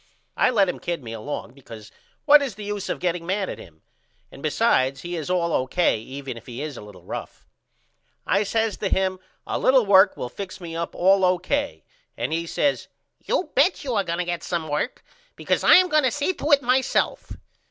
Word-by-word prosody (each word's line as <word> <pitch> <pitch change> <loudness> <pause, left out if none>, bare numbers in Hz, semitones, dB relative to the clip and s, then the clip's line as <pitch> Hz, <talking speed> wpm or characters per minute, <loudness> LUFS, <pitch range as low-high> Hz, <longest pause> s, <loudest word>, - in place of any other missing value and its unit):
I - - +3
let 205 -6 +3
him 180 - -3
kid 170 -5 -4
me 115 -1 -7
along 115 +1 -6
because 115 -5 -12 0.3
what 295 -1 +8
is 270 -8 -3
the 210 - -8
use 205 -1 -4
of - - -1
getting 175 -1 -1
mad 190 +3 -2
at - - -6
him? 80 -2 -15 0.5
And - - -12
besides 130 +1 +1
he 175 0 -5
is 160 -2 -5
all 170 -2 0
O.K. 130 0 +1
even 130 +2 -7
if 115 - -13
he 120 0 -7
is 150 -3 -5
a - - -9
little 100 -4 -13
rough. - - -8 0.8
I 200 - +2
says 220 0 0
to 200 - -2
him 185 -1 0 0.3
A - - -2
little 260 -3 +4
work 195 0 +5
will - - -4
fix 190 +8 -8
me 170 -2 -7
up 170 0 -4
all 190 +2 +4
O.K. 185 +11 0 0.3
and - - -2
he 165 +1 -2
says 285 - 0 0.3
You 480 -7 -2
bet - - +2
you 260 -3 -3
are 205 -3 +1
going 170 -2 -3
to 180 - -1
get 175 -1 -3
some 170 -3 -3
work 150 - -3 0.3
because - - -1
I - - +8
am 365 0 +6
going 305 -3 +3
to - - +4
see 290 +8 -1
to 305 -3 -3
it 280 -2 +5
myself. 255 +2 0
180 Hz, 215 wpm, -23 LUFS, 150-225 Hz, 0.8 s, what